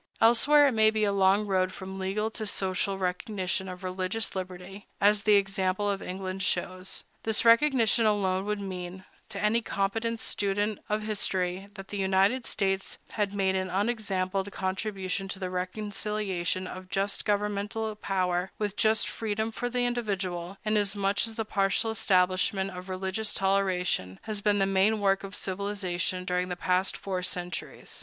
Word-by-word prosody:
Elsewhere 285 +6 +6
it - - -1
may 220 -2 +5
be 215 0 0
a 205 - +3
long 200 +1 +4
road 185 -2 +1
from 190 0 -7
legal 205 +4 -1
to 220 -1 -4
social 195 0 0
recognition 185 0 -2
of 180 +1 -8
religious 185 +4 -2
liberty, 185 +1 -6
as 205 +1 +4
the 210 -1 +5
example 195 0 +1
of 200 -1 -1
England 185 +1 -4
shows. 185 0 -2 0.2
This 220 +1 0
recognition 230 -2 +5
alone 190 -2 +1
would 210 0 -1
mean, 185 -1 -6 0.2
to - - -5
any 215 +3 +2
competent 225 +3 -1
student 205 0 0
of 210 0 0
history, 195 -3 -1
that 195 -1 -9
the 205 - -4
United 195 +6 +2
States 195 -1 -1
had 205 -2 -1
made 190 -1 +2
an 185 0 -1
unexampled 195 -1 -1
contribution 190 0 -2
to 195 - -4
the 185 -1 -4
reconciliation 190 -1 -2
of 185 0 -8
just 195 +1 -1
governmental 210 +1 -1
power 185 -3 -1
with 205 -2 -2
just 220 +1 +3
freedom 220 0 -2
for 245 +2 -3
the 245 0 0
individual, 195 -6 -2
inasmuch 205 -1 +2
as 225 - -7
the 225 -1 -2
partial 205 +2 +1
establishment 190 -1 +2
of 180 +1 -8
religious 190 +3 -2
toleration 185 - +1
has 215 -2 -3
been 205 0 +3
the 195 - +3
main 195 +3 +3
work 195 -1 +2
of 195 0 -7
civilization 185 -2 -2
during 180 0 0
the 180 - -2
past 185 +1 +1
four 185 -2 -3
centuries. 180 -1 -4
195 Hz, 160 wpm, -28 LUFS, 185-210 Hz, 0.2 s, Elsewhere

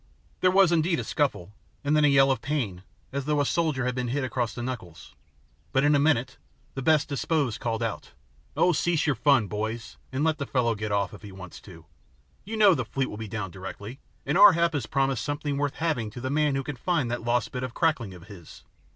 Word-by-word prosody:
There 185 - +4
was 190 -1 +5
indeed 165 0 +2
a - - -2
scuffle, 115 - -1 0.3
and 145 +1 +2
then 150 - +4
a - - +6
yell 135 -1 +5
of 130 - -1
pain, 130 -12 -2 0.3
as 140 0 -3
though 150 0 +1
a 145 - +2
soldier 155 -6 0
had 125 - 0
been 125 -1 -2
hit 135 +4 -1
across 120 -2 -1
the 120 - -5
knuckles; 110 -11 -7 0.6
but 135 - +3
in 145 +1 +4
a 145 - +4
minute 130 -4 +1 0.4
the 135 - -5
best 155 +1 +3
disposed 140 -4 -1
called 115 -2 -2
out, 115 - -4 0.5
"Oh, 180 - +4
cease 170 0 +1
your 150 - +2
fun, 120 -1 +3
boys, 110 +3 -5
and 135 +2 -1
let 155 -1 +1
the 140 - -3
fellow 120 -3 +1
get 105 0 -4
off 100 0 0
if 105 - -11
he 105 -1 -10
wants 95 -2 -11
to. 85 -5 -14 0.6
You 220 +3 -5
know 205 -3 +7
the 130 -6 -1
fleet 135 +3 -3
will 105 - -7
be 110 0 -6
down 100 -2 -4
directly, 100 +7 -8 0.3
and 145 - +1
Ar 205 -2 +10
hap 170 0 +1
has 135 -7 -2
promised 135 -3 0
something 145 -1 -2
worth 145 -1 -1
having 155 -10 -1
to 115 - -9
the 130 +2 -3
man 150 -1 +2
who 135 - -1
can 145 -1 -6
find 145 -3 0
that 120 - -2
lost 120 -1 0
bit 125 - -4
of 130 -1 -5
crackling 135 - 0
of 85 -1 -13
his. 95 -6 -13
130 Hz, 235 wpm, -26 LUFS, 115-150 Hz, 0.6 s, Ar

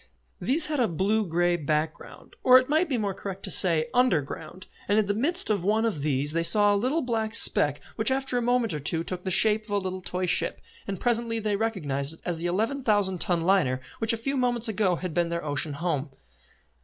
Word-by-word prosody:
These 300 +5 +2
had 300 -2 -2
a 240 - +2
blue 200 +4 0
grey 175 +1 +1
background, 155 0 -4
or 255 0 +7
it 255 0 +1
might 315 +4 +1
be 260 - 0
more 205 -3 -2
correct 195 0 -8
to - - -2
say 165 -4 +5
under 250 -9 +3
ground, 160 +6 -9 0.2
and 205 - +2
in 215 - +3
the 205 - -1
midst 300 - +1
of 200 -5 -1
one 215 +4 +1
of 200 -11 -2
these 145 0 -1
they 165 +1 -1
saw 205 +5 +4
a - - +2
little 260 +10 0
black 225 -2 -1
speck 145 -9 +3 0.2
which 220 - +2
after 265 -1 -1
a 245 - +1
moment 240 -4 0
or 150 - -3
two 160 +3 -1
took 180 +1 -5
the 190 - -4
shape 215 +3 +3
of - - -18
a 205 - 0
little 185 -1 -4
toy 180 0 -3
ship, 180 - +1 0.3
and 195 -2 -4
presently 235 -1 0
they 215 -2 -1
recognised 160 -10 -2
it - - -25
as 175 -2 -3
the 170 - -2
eleven 225 +10 -1
thousand 205 -6 +1
ton 175 -2 0
liner 165 -8 +1 0.2
which 225 -1 +1
a 230 - -2
few 275 +5 -3
moments 245 -2 0
ago 205 -4 0
had 180 -1 -5
been 170 +1 0
their 170 -1 -4
ocean 145 +1 -1
home. 150 -2 -3
200 Hz, 230 wpm, -26 LUFS, 170-230 Hz, 0.3 s, or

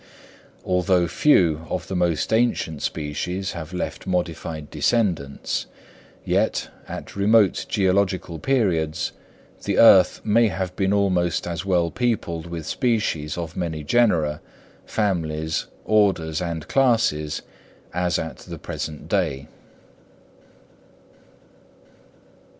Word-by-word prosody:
Although 90 -1 +2
few 85 - +3
of 90 - -3
the 95 - -4
most 90 +2 0
ancient 110 -9 +1
species 90 +6 -3
have 85 -1 -7
left 90 +1 -4
modified 80 -4 -3
descendants, 90 -12 0 0.6
yet, - - 0 0.2
at - - -8
remote 100 0 +3
geological 95 -3 +1
periods, 90 - 0 0.5
the - - -1
earth 95 -5 +7
may 115 +2 +4
have 95 -2 -3
been 95 0 +1
almost 90 -4 +1
as 85 0 -4
well 90 -3 +1
peopled 90 -9 -1
with 85 -2 -6
species 105 - -1
of 85 -2 -5
many 80 -4 -3
genera, 80 -6 +2 0.5
families, 80 -6 -1 0.2
orders 95 -6 +2
and 85 -3 -4
classes, 115 - +1 0.5
as 90 0 0
at 80 - -5
the - - -9
present 75 -1 -6
day. 80 -8 -1
90 Hz, 105 wpm, -23 LUFS, 80-100 Hz, 0.6 s, earth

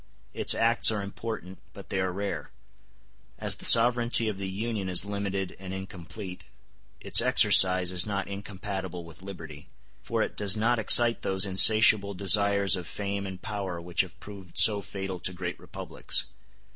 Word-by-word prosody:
Its - - +4
acts 115 +1 +2
are 105 -2 -4
important, 100 -2 -8
but - - -13
they 95 - -3
are 95 -1 -2
rare. 100 +2 -6 0.9
As - - -2
the - - -7
sovereignty 120 -1 +4
of 105 -3 -5
the 95 -1 -5
Union 105 0 -5
is 90 +2 +2
limited 100 -2 -5
and 95 0 -8
incomplete, 95 0 -10 0.5
its - - +4
exercise 90 -1 +4
is 90 -1 0
not 100 -2 -4
incompatible 95 -2 -7
with 85 +2 -14
liberty; 80 -6 -11 0.3
for - - -2
it - - -7
does 105 0 +1
not 115 +2 0
excite 115 +2 +5
those 95 +1 +1
insatiable 100 +1 +4
desires 100 +1 +3
of 90 -2 -8
fame 100 -1 -5
and 95 -1 -10
power 95 -5 -6
which 85 0 -1
have 95 0 -10
proved 100 -4 -12
so 105 -2 +6
fatal 95 -1 -7
to 95 - -1
great 90 0 -7
republics. - - -3
100 Hz, 160 wpm, -26 LUFS, 95-105 Hz, 0.9 s, so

